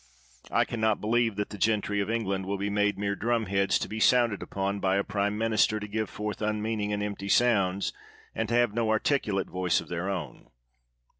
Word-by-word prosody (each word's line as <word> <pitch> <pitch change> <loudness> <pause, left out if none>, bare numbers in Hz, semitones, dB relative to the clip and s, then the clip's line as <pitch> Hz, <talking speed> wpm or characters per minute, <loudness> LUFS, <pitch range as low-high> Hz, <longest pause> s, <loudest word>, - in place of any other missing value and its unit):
I - - +2
can 115 - -5
not 110 -1 +2
believe 115 0 +1
that 105 0 -3
the 105 - -8
gentry 105 -1 +1
of 100 - -1
England 100 -5 -1
will 100 +1 -1
be 100 +1 -2
made 105 0 +1
mere 100 0 -1
drumheads 100 -3 +1
to - - -3
be 110 - -5
sounded 120 -3 +3
upon 100 +1 -2
by 95 -1 +1
a 100 - +2
prime 100 +1 -1
minister 110 -1 +2
to 105 - -6
give 110 0 -2
forth 105 0 -5
unmeaning 105 0 -1
and 105 0 -1
emptA' 100 -1 -4
sounds, 100 -5 +2 0.4
and 110 -1 -2
to 120 - +1
have 120 -3 +3
no 115 -1 0
articulate 110 -3 +1
voice 90 0 +1
of - - -9
their 90 +2 -2
own. 85 -9 -5
105 Hz, 205 wpm, -28 LUFS, 100-110 Hz, 0.4 s, sounded